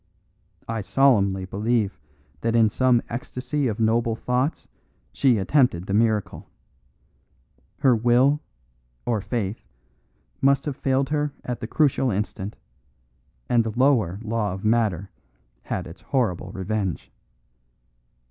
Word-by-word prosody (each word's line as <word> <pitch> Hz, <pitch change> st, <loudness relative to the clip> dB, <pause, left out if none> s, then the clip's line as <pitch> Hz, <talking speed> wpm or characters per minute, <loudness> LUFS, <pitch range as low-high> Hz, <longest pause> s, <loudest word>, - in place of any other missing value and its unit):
I 115 Hz, -1 st, -2 dB
solemnly 100 Hz, -4 st, +3 dB
believe 105 Hz, 0 st, -1 dB, 0.4 s
that 115 Hz, 0 st, 0 dB
in 110 Hz, -2 st, +4 dB
some 125 Hz, 0 st, +3 dB
ecstasy 130 Hz, +3 st, -3 dB
of 110 Hz, -1 st, -3 dB
noble 115 Hz, +1 st, +2 dB
thoughts 125 Hz, +6 st, -1 dB, 0.5 s
she 130 Hz, -5 st, +3 dB
attempted 100 Hz, -, +2 dB
the 100 Hz, -, -3 dB
miracle. 110 Hz, -1 st, 0 dB, 1.3 s
Her 135 Hz, -4 st, +4 dB
will, 125 Hz, +6 st, +3 dB, 0.7 s
or 115 Hz, -4 st, 0 dB
faith, 110 Hz, -2 st, -3 dB, 0.8 s
must 140 Hz, 0 st, +3 dB
have 145 Hz, -3 st, -3 dB
failed 135 Hz, 0 st, 0 dB
her 150 Hz, -1 st, -1 dB
at 125 Hz, -2 st, -3 dB
the 115 Hz, -, -5 dB
crucial 135 Hz, -1 st, +2 dB
instant, 100 Hz, -1 st, -3 dB, 0.9 s
and 120 Hz, -1 st, +3 dB
the 110 Hz, 0 st, -5 dB
lower 120 Hz, -9 st, +3 dB
law 110 Hz, -3 st, -1 dB
of 95 Hz, +2 st, -7 dB
matter 105 Hz, -5 st, +1 dB, 0.5 s
had -, -, -4 dB
its 85 Hz, +3 st, -11 dB
horrible 120 Hz, -11 st, -1 dB
revenge. 95 Hz, -2 st, -3 dB
115 Hz, 120 wpm, -24 LUFS, 105-130 Hz, 1.3 s, in